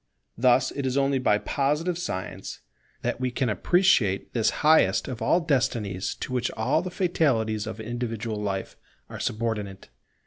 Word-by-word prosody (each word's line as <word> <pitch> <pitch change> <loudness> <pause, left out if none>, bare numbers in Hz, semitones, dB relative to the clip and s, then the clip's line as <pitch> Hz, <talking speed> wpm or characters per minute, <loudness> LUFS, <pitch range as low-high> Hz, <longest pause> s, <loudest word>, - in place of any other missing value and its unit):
Thus 125 +2 +3
it 140 -1 -3
is 130 +1 -1
only 135 -1 +2
by 105 -5 +3
Positive 150 +9 0
science 95 - -5 0.4
that - - -2
we 130 - +1
can 125 0 -1
appreciate 110 - +2
this 110 -3 +2 0.2
highest 155 +1 +4
of 125 -3 -6
all 170 +10 +3
destinies 120 - -1
to 130 - -4
which 120 -1 0
all 110 +8 +2
the 185 - -4
fatalities 120 - 0
of 110 -1 -6
individual 115 -1 -4
life 95 -2 -3 0.4
are - - -7
subordinate. 105 - -3
120 Hz, 150 wpm, -26 LUFS, 110-140 Hz, 0.4 s, highest